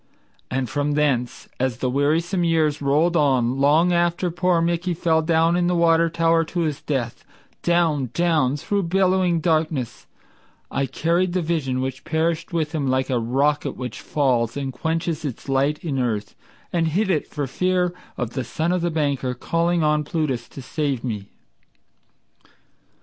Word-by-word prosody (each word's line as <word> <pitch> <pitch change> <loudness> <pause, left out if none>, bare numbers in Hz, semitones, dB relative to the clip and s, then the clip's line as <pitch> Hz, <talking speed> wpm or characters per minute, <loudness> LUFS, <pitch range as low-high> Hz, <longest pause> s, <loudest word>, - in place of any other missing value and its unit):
And 130 0 -1
from 145 +4 -1
thence, 140 -5 0
as 130 -3 0
the 130 - -1
wearisome 160 +7 +1
years 160 -3 +1
rolled 150 +5 +2
on, 130 -4 +2
long 155 +6 +4
after 175 +1 +1
Poor 180 0 +2
Mickey 170 +1 0
fell 160 -1 +2
down 165 +1 +2
in 175 0 +1
the 180 - +1
water 165 -1 +4
tower 165 0 +2
to 175 +2 -3
his 155 -4 -2
death 125 -5 -3 0.4
Down, 165 -7 +1
down, 155 -4 +1
through 200 +7 -1
bellowing 185 -2 +2
darkness, 155 - -1 0.6
I 135 0 0
carried 170 +6 0
The 180 -1 0
vision 145 -6 -1
which 130 0 -4
perished 165 +1 -1
with 160 -3 -1
him 150 -4 -2
like 130 0 0
a 125 - +2
rocket 140 +6 0
which 125 -3 -6
falls 125 -4 0
And 135 -2 -3
quenches 165 0 -2
its 140 -4 -6
light 140 +2 +1
in 145 -6 -2
earth, 110 -5 -2 0.4
and 165 -2 +2
hid 190 +5 +1
it 155 - 0
for 145 -2 -3
fear 180 +5 0 0.2
Of 120 -2 -3
the 130 - -3
son 160 +7 -2
of 180 -1 0
the 175 - 0
banker, 140 -5 -1
calling 170 +5 0
on 150 0 +2
Plutus 145 -6 -2
to 135 - -10
save 140 -2 -2
me? 105 -5 -4
155 Hz, 165 wpm, -22 LUFS, 135-170 Hz, 0.6 s, long